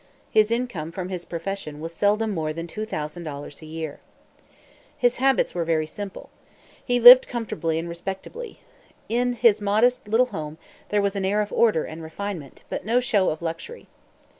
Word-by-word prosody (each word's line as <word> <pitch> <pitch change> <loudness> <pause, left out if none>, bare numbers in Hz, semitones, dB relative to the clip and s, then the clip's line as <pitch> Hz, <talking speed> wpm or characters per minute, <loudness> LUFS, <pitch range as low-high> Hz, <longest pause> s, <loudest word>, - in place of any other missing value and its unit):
His 215 -1 +4
income 230 -10 -2
from 180 +1 -5
his 180 -2 -5
profession 170 -3 -5
was 165 +2 -6
seldom 210 +4 +1
more 155 -5 -2
than 165 +1 -5
$2,000 155 -6 -6
a - - -10
year. 160 -2 -6 1.0
His 245 -1 +2
habits 270 0 +2
were 175 - -1
very 160 -1 +1
simple. 200 +5 -8 0.5
He 245 -1 +1
lived 245 +2 +10
comfortably 200 -9 -2
and 165 +1 -3
respectably. 195 - -7 0.5
In 245 +2 +1
his 230 -3 +4
modest 215 +4 +2
little 225 +4 +4
home 155 -2 -5 0.3
there 205 -1 +2
was 200 0 0
an 195 - -2
air 200 +2 +1
of 205 - -9
order 215 -9 +3
and 160 +1 -8
refinement, 160 -2 -7
but - - -4
no 230 +5 +2
show 210 -6 +2
of 155 +2 -4
luxury. 165 - -6
195 Hz, 165 wpm, -24 LUFS, 165-225 Hz, 1.0 s, lived